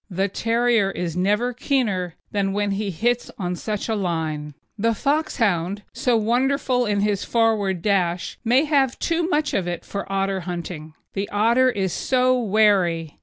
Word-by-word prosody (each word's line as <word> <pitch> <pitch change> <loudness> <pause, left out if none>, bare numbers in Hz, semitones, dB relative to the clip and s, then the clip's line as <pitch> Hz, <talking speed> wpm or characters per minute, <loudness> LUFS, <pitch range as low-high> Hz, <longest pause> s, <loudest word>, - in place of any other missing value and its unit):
The 190 +1 0
terrier 230 0 +1
is 175 -4 -4
never 210 +7 +1
keener 210 - -1 0.2
than 195 -1 0
when 205 0 0
he 200 +1 -2
hits 240 +7 0
on 180 -4 -2
such 210 +3 -4
a 225 - 0
line. 160 -7 -2 0.2
The 230 +2 +1
Foxhound, 205 - 0
so 245 -2 +1
wonderful 250 +2 +1
in 205 -1 +1
his 205 -1 0
forward 215 -6 +1
dash, 180 -4 0
may 250 +4 +4
have 275 -4 +2
too 335 +1 0
much 300 -2 0
of 185 -3 0
it 175 -1 -4
for 200 -1 -5
otter 195 0 0
hunting. 170 -3 -6 0.2
The 200 +1 -3
otter 235 +5 +3
is 190 -7 -1
so 255 0 +2
wary. 195 -8 +2
205 Hz, 160 wpm, -23 LUFS, 180-240 Hz, 0.2 s, may